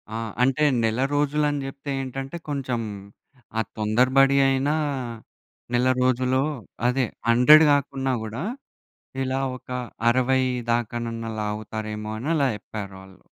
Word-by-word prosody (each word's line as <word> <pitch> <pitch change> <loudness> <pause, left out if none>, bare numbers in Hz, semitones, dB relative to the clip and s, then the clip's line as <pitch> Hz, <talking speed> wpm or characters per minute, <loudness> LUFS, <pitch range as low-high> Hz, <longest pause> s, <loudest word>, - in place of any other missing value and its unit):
ఆ! - - -1 0.3
అంటే 135 +3 +2 0.2
నెల 110 +2 +1 0.2
రోజులు 150 +1 +1
అని 145 -1 -2
చెప్తే 140 +1 -8
ఏంటంటే, 135 +4 -5
కొంచెం, 130 -4 -2 0.8
ఆ - - +3 0.2
తొందరబడి 130 +6 +3
అయినా, 135 +3 +1 1.0
నెల 125 +1 +3
రోజులో 130 +1 +2 0.4
అదే 125 0 +2 0.2
100 150 +7 +8
కాకున్నా 135 -2 0
కూడా, 115 +8 -5 0.8
ఇలా 130 +1 -1 0.2
ఒక - - -24 0.4
60 130 +2 +3 0.3
దాకనన్నా 115 -1 -2
లాగుతారేమో 105 0 -4
అని 135 - -5
అలా 140 -3 +3
చెప్పారు 100 -1 -8
వాళ్ళు. 95 0 -16
130 Hz, 115 wpm, -24 LUFS, 115-135 Hz, 1.0 s, 100